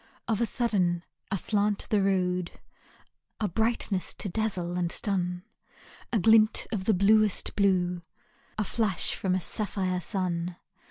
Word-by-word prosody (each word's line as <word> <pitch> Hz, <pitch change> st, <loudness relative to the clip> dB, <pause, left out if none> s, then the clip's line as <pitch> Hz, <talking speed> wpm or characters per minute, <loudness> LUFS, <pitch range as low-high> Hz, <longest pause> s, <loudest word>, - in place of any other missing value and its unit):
Of 225 Hz, -1 st, 0 dB
a 235 Hz, -, +2 dB
sudden, 185 Hz, -8 st, 0 dB, 0.3 s
aslant 205 Hz, +1 st, 0 dB
the 210 Hz, -2 st, +3 dB
road, 180 Hz, -2 st, 0 dB, 0.9 s
A 215 Hz, -, 0 dB
brightness 220 Hz, -1 st, 0 dB
to 200 Hz, -, -2 dB
dazzle 180 Hz, -4 st, -2 dB
and 175 Hz, -1 st, 0 dB
stun, 180 Hz, -4 st, -1 dB, 0.7 s
A 230 Hz, -, +2 dB
glint 220 Hz, +2 st, +4 dB
of 200 Hz, -4 st, -2 dB
the 215 Hz, -, +3 dB
bluest 210 Hz, +2 st, +3 dB
blue, 180 Hz, -3 st, +1 dB, 0.6 s
A 215 Hz, -, +1 dB
flash 205 Hz, -3 st, 0 dB
from 185 Hz, -1 st, -1 dB
a -, -, +1 dB
sapphire 185 Hz, -2 st, -1 dB
sun. 180 Hz, -3 st, -2 dB
195 Hz, 130 wpm, -28 LUFS, 180-215 Hz, 0.9 s, glint